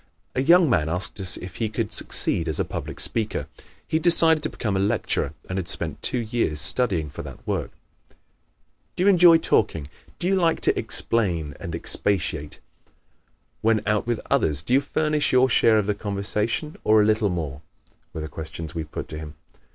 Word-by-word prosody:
A 130 - 0
young 170 +4 +5
man 80 - +1
asked 90 +4 -4
us 95 -2 -1
if 90 -1 -9
he 110 - -1
could 110 0 -3
succeed 85 - 0
as 80 - -3
a - - +1
public - - -6
speaker. 110 -2 -2 0.4
He 160 - +1
had - - -3
decided 165 -2 +7
to - - -1
become 105 -4 -3
a - - +1
lecturer 100 +2 -1
and 95 +1 -3
had 90 - -6
spent - - -3
two - - +1
years 115 -9 -1
studying 90 -1 +3
for 75 - -8
that - - -11
work. - - -2 1.3
"Do 180 - 0
you 200 - +5
enjoy 175 -3 +7
talking? 80 - 0 0.3
Do - - -4
you 195 - +2
like 170 -3 +2
to - - +2
explain 85 -10 -1
and 85 - -5
expatiate? 85 -4 -1 1.0
When 110 -1 +2
out 105 +1 0
with 120 -2 0
others 75 -1 +1
do 120 - -2
you 135 - +5
furnish 150 +1 0
your 130 0 +4
share 110 0 +4
of 105 - +1
the 105 - 0
conversation 105 +7 -3
or 110 0 +4
a 105 - +4
little 110 -1 +2
more?" 75 -6 -4 0.5
were 80 - -6
the 80 - -5
questions 80 0 -7
we 80 - -3
put 75 - -7
to 75 - -6
him. 75 -1 -9
105 Hz, 190 wpm, -24 LUFS, 85-125 Hz, 1.3 s, decided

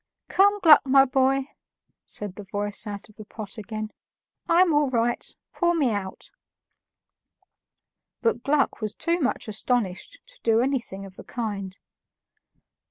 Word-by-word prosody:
"Come, 405 +2 +4
Gluck, 310 -4 +8
my 270 0 +5
boy," 265 +1 +1 0.6
said 205 -3 -4
the 205 - -9
voice 205 +2 -1
out 205 0 -6
of 215 - -21
the 215 - -8
pot 215 0 -7
again, 215 +1 -5 0.6
"I'm 345 0 +5
all 295 -2 +3
right; 240 -1 0 0.2
pour 345 -1 +1
me 280 -7 +2
out." 200 -3 -5 1.9
But 230 0 0
Gluck 280 -3 +1
was 215 0 -3
too 340 +1 0
much 265 -6 -1
astonished 220 - -2
to - - -17
do 225 -1 +3
anything 240 -7 -2
of 190 -1 -14
the - - -10
kind. 200 -5 -5
235 Hz, 140 wpm, -25 LUFS, 205-280 Hz, 1.9 s, Gluck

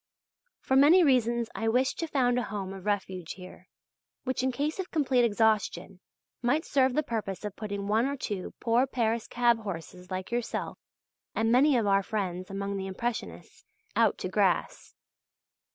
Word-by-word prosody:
For 265 - 0
many 305 +7 +7
reasons 235 -5 +2
I 225 - -2
wish 250 +4 +2
to 330 - -2
found 250 -5 +2
a 245 - -4
home 195 -2 -4
of 195 +1 -9
refuge 190 -4 -2
here, 185 -1 -12 0.6
which 260 -1 -1
in 260 0 +1
case 290 +7 -2
of 370 - -3
complete 265 -6 +2
exhaustion 210 -4 +1 0.4
might 285 +7 +1
serve 260 -2 +2
the 305 - +2
purpose 210 -5 -4
of 205 -2 -5
putting 200 -2 -4
one 220 +5 +2
or 280 0 -3
two 205 -7 -5
poor 240 +3 +2
Paris 230 -3 -1
cab 240 -1 +2
horses 180 -3 -7
like 185 +1 -5
yourself 240 -1 -3 0.6
and 225 0 +1
many 265 +2 +5
of 225 - +1
our 195 0 +4
friends 185 -3 -3
among 200 0 -3
the 190 0 -4
Impressionists, 190 - -5 0.3
out - - +3
to - - -4
grass. - - 0
225 Hz, 170 wpm, -28 LUFS, 195-255 Hz, 0.6 s, many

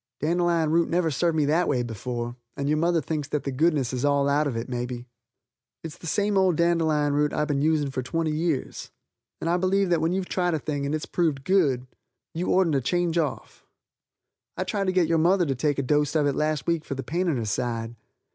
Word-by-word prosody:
Dandelion 170 0 +1
root 170 +1 +2
never 170 -2 +1
served 165 +4 +1
me 150 - +3
that 165 +5 +2
way 125 -4 +1
before 120 +1 -4 0.2
and 140 - -2
your 150 +1 +2
mother 170 0 +2
thinks 150 0 -3
that 150 -1 -2
the 140 - -3
goodness 140 -2 +1
is 125 - -2
all 140 -1 +2
out 145 +1 +2
of 125 -5 -3
it, 115 - -4
may 125 -1 -3
be. 120 -1 -7 0.8
It's 160 -2 -7
the 170 - -8
same 205 +4 +1
old 185 -3 +3
dandelion 160 -4 +2
root 150 +1 +2
that - - -3
I've 150 - +1
been 140 -1 0
using 150 -2 +1
for 130 - -2
twenty 160 +5 -1
years, 155 -3 -2 0.5
and - - -4
I 175 +1 +2
believe 185 0 +2
when 160 +1 0
you've 185 0 -2
tried 180 -2 0
a - - +1
thing 145 -1 -3
and 155 +2 -3
proved 160 -6 0
it's - - -17
good, 145 -10 +2 0.5
you 170 +3 -3
ortent 185 -4 +3
to 135 - +2
change 175 +4 0
off. 150 -4 -4 0.9
I - - 0
tried 195 +1 -2
to - - +3
get 185 -2 +3
your 165 -1 +2
mother 175 +2 +3
to 140 - 0
take 145 +3 0
a 140 - 0
dost 150 +3 +1
of 150 -2 +3
it 140 - +2
last 155 0 -1
week 170 -2 0
for 140 - -5
the 135 - -5
pain 180 +4 -1
in 155 -6 +1
her 115 - -2
side. 115 +1 -2
155 Hz, 235 wpm, -25 LUFS, 140-170 Hz, 0.9 s, me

